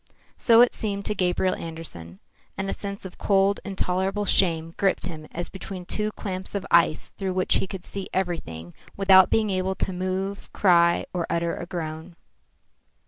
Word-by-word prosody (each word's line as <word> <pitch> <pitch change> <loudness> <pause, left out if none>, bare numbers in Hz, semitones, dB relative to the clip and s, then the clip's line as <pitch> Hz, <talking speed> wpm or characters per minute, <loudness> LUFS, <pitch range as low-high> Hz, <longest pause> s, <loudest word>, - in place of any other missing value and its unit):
So 230 -1 +6
it 245 - +5
seemed 200 -2 -2
to 210 - 0
Gabriel 185 -1 +1
Andersen; 155 - -7 0.4
and 195 0 -2
a - - -1
sense 200 -1 -6
of 185 - -10
cold, 195 0 +3
intolerable 195 +1 -1
shame 165 -4 +2
gripped 195 -2 +1
him 155 -2 -6
as 175 +1 -4
between 190 -1 -8
two 210 +3 0
clamps 190 0 -6
of 200 - -2
ice 170 -2 +3
through 190 -2 -4
which 185 - +2
he - - -1
could 190 -1 -7
see 195 -1 -6
everything 85 - -3 0.2
without 190 -1 +7
being 215 -2 +2
able 190 0 0
to 190 - -2
move, 185 +2 -3
cry 170 -3 +4
out - - -10
or 175 -2 -2
utter 170 0 0
a 175 - -7
groan. 165 -1 -6
185 Hz, 175 wpm, -25 LUFS, 170-195 Hz, 0.4 s, without